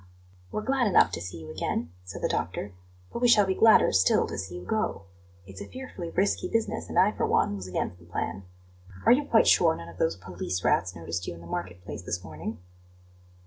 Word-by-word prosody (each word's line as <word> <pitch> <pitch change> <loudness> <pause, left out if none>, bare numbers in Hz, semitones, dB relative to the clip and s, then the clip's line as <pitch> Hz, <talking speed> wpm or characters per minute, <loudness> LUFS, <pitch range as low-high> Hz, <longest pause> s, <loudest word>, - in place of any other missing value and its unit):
"We're 215 - -3
glad 265 -2 +2
enough 195 - +5
to - - -4
see 90 -1 -6
you 80 -1 -9
again," 80 +1 -2
said 90 - -8
the - - +3
doctor; 95 +4 -3 0.4
"but - - -4
we 245 - +5
shall 210 -4 +6
be 190 - +1
gladder 220 +2 +6
still 95 0 +4
to - - -6
see 95 -1 -5
you 90 0 -8
go. 215 - -1 0.4
It's 95 +1 -10
a - - -7
fearfully 255 -10 -7
risky 195 +4 0
business, 225 -1 -1
and - - -4
I, - - +6
for - - -1
one, 100 - +2
was 95 -2 -6
against 90 -1 -3
the 85 - -17
plan. 90 +2 -4 0.6
Are - - +7
you 280 +4 +4
quite 230 -5 +4
sure 165 -2 +5
none 85 - -9
of 85 - -14
those 80 0 +1
police 90 0 -5
rats 90 +1 +1
noticed 85 +1 -4
you - - -4
in 85 - -12
the - - -12
market 90 +1 -5
place 100 - -6
this 90 0 -4
morning?" 80 +8 -6
95 Hz, 225 wpm, -27 LUFS, -, 0.6 s, Are